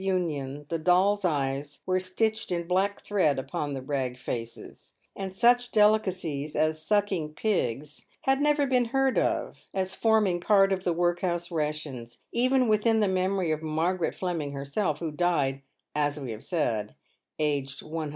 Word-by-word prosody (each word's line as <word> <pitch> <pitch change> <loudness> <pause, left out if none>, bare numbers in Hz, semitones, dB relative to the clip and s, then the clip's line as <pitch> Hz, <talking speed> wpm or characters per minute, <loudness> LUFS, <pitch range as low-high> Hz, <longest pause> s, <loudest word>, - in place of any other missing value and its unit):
Union 150 -7 -2
the 165 - -1
dolls' 190 +5 +3
eyes 145 -3 -1
were 185 0 +1
stitched 215 +4 -1
in 170 -1 -1
black 190 +3 0
thread 185 -8 +1
upon 140 +2 -3
the 130 - -5
rag 130 -2 -2
faces; 115 -2 -7 0.2
and 195 -1 -4
such 245 +5 +3
delicacies 185 -9 +1
as 155 +1 +1
sucking 190 -5 0
pigs 150 - -2
had 270 +1 +2
never 295 -1 +3
been 255 -2 +2
heard 270 +2 +2
of - - -2
as 190 0 -1
forming 215 -5 +2
part 195 0 +4
of 190 -1 -3
the 180 - +1
work 175 +1 +1
house 175 -1 -2
rations 150 -7 -3
— - - -53
even 255 -1 +3
within 220 +1 +3
the 210 - +3
memory 185 -2 0
of 155 0 -1
Margaret 165 +3 -1
Fleming 165 -6 -3
herself, 140 +4 -1
who 160 0 -4
died, 150 -5 0 0.3
as 145 0 0
we 130 -4 -5
have 110 0 -8
said, 115 - -1 0.4
aged 140 -2 -1
103. 155 -1 -4
175 Hz, 160 wpm, -27 LUFS, 145-195 Hz, 0.4 s, part